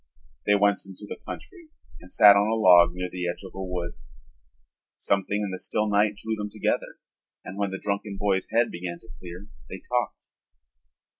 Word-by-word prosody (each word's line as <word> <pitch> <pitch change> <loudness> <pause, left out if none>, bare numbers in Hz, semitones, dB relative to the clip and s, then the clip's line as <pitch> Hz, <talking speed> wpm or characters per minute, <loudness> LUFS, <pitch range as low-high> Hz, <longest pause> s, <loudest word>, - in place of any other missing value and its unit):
They 105 - +5
went 100 -1 +2
into 95 +2 -10
the - - -8
country 350 -5 -9 0.3
and 90 - -15
sat 105 -3 +8
on 100 +1 +3
a 110 - +1
log 90 -4 +6
near 90 0 -3
the 90 0 -4
edge 90 - -6
of 95 - -10
a 95 - -6
wood. 90 -2 -4 1.0
Something 100 +1 0
in 100 - -3
the 95 - -5
still 110 0 0
night 105 0 +2
drew 110 +2 -4
them 105 -1 -4
together - - -2 0.5
and 95 - -7
when 100 0 -1
the 95 - -4
drunken 100 0 -3
boy's 95 -1 0
head 115 +1 +2
began 85 0 -5
to 115 - -19
clear 90 +3 -10 0.2
they 95 - -6
talked. 120 +2 -3
100 Hz, 190 wpm, -26 LUFS, 90-105 Hz, 1.0 s, sat